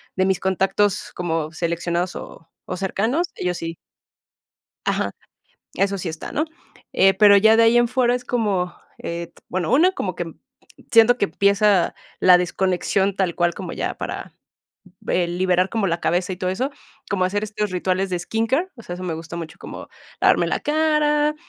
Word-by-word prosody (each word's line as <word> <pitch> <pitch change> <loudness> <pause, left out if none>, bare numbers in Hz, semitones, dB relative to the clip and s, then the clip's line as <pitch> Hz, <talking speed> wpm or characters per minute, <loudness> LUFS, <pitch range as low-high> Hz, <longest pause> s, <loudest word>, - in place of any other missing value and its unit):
de 185 - +2
mis 190 -2 +1
contactos 190 +2 0
como 165 -3 -2
seleccionados 170 +1 -2
o 165 - -10 0.2
o 185 - -5
cercanos, 220 - 0
ellos 180 -1 -2
sí. 165 0 -5 1.1
Ajá. - - 0 0.6
Eso 195 +1 0
sí 180 - -4
está, 160 -1 -6
¿no?, 305 - 0 0.5
eh, 195 0 +6
pero 205 0 +7
ya 220 +2 +6
de 230 - +5
ahí 230 +1 +5
en 240 0 +4
fuera 250 0 +2
es 245 0 -4
como, 200 -8 0 0.3
eh, 170 0 -5
t - - -21
bueno, 185 +4 -2
una, 325 +8 +5
como - - -3
que - - -4
m - - -7 0.6
siento 230 +2 +6
que - - +2
empieza 200 -2 +2 0.3
la 180 -1 +7
desconexión 190 +2 0
tal 185 -3 0
cual 175 -1 +1
como - - -6
ya - - -3
para, - - -6 0.8
eh, 175 -1 +1
liberar 180 +1 +1
como 220 -2 0
la 170 -1 -1
cabeza 180 +2 0
y - - -9
todo 185 0 -1
eso, 255 +9 -1 0.4
como 185 -3 +1
hacer 205 +3 -1
estos 210 -1 -3
rituales 185 +1 0
de 180 - -1
skincare, 230 - 0
o 230 - -13
sea, 175 - -6
eso 180 - -7
me 175 -3 -2
gusta 165 +1 -8
mucho 165 -2 -7
como - - -9 0.3
lavarme - - +4
la - - -1
cara, 300 -1 +2
190 Hz, 180 wpm, -22 LUFS, 180-225 Hz, 1.1 s, pero